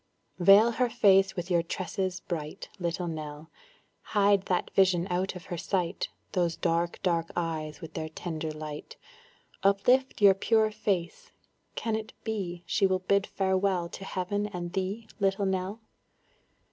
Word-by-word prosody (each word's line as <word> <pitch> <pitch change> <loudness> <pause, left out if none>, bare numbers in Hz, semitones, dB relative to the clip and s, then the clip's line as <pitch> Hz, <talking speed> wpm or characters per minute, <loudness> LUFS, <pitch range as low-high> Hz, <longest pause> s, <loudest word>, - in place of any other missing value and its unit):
Veil 200 +6 +7
her 245 +1 +1
face 195 -4 +4
with 175 0 -4
your 170 -1 +4
tresses 185 +1 -3
bright, 160 +1 -5
Little 175 0 -2
Nell; 155 -1 -6 0.7
Hide 200 -1 +4
that 180 -1 0
vision 185 -3 +3
out 185 +2 -1
of 180 - -9
her 175 - -5
sight 180 -2 -1 0.2
Those 170 -2 +1
dark 170 0 0
dark 170 -3 +1
eyes 160 -3 -3
with 160 -1 -9
their 155 0 -4
tender 160 -1 -4
light 155 -1 -7 0.6
Uplift 245 +7 +3
your 200 -2 +8
pure 215 +3 +2
face, 200 -5 -2 0.4
can 225 -1 -1
it 220 0 -5
be 185 -6 -3
She 195 - +2
will 190 0 +2
bid 200 +2 +1
farewell 190 -2 0
to 195 - -8
heaven 200 +2 -2
and 175 -3 -6
thee, 195 +4 -3
Little 195 0 +1
Nell? 190 +3 -2
185 Hz, 145 wpm, -29 LUFS, 170-200 Hz, 0.7 s, your